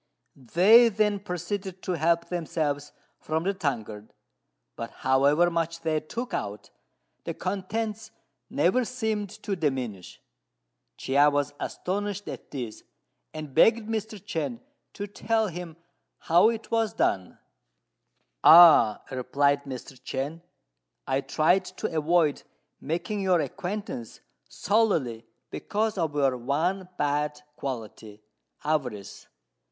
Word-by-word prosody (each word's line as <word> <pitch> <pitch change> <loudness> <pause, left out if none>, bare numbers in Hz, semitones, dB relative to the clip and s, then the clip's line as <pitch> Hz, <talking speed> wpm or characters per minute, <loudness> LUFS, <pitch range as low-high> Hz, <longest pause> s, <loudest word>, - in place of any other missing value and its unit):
They 190 - +6
then 210 -1 +1
proceeded 190 0 -5
to - - -2
help 170 0 +1
themselves 150 -4 -2 0.3
from 160 +1 -2
the 195 +2 0
tankard; 110 - -4 0.6
but 115 0 -5 0.2
however 140 +6 +4
much 165 0 -2
they 155 -1 0
took 235 +11 -6
out, 100 0 -4 0.5
the - - -5
contents 215 +3 -3 0.4
never 185 - +2
seemed 220 -4 -2
to 200 - -1
diminish. 130 - -3 0.8
Chia 140 +2 +4
was 145 0 -1
astonished 205 +1 -3
at - - -8
this, 125 -6 -6 0.5
and 155 -3 -8
begged 220 - +4
Mr. 220 -1 -3
Chên 175 +5 -4 0.3
to 205 - -5
tell 220 +1 0
him 170 -2 -8 0.4
how 175 +6 +4
it 230 -1 -5
was 225 -1 +1
done. 95 - 0 1.1
"Ah," 160 -10 +8
replied 140 +2 +1
Mr. 130 -1 -8
Chên, 140 +6 -4 0.6
"I 135 - 0
tried 175 +7 +2
to - - -3
avoid 155 -1 +2 0.4
making 175 +7 -3
your 185 -3 +3
acquaintance 175 - -5 0.3
solely 165 - 0 0.2
because 215 -1 -2
of 160 -3 -1
your 135 -3 +2
one 170 +9 -1
bad 150 0 0 0.2
quality 110 -5 -7 0.4
avarice. 125 -10 -3
165 Hz, 115 wpm, -27 LUFS, 140-200 Hz, 1.1 s, Ah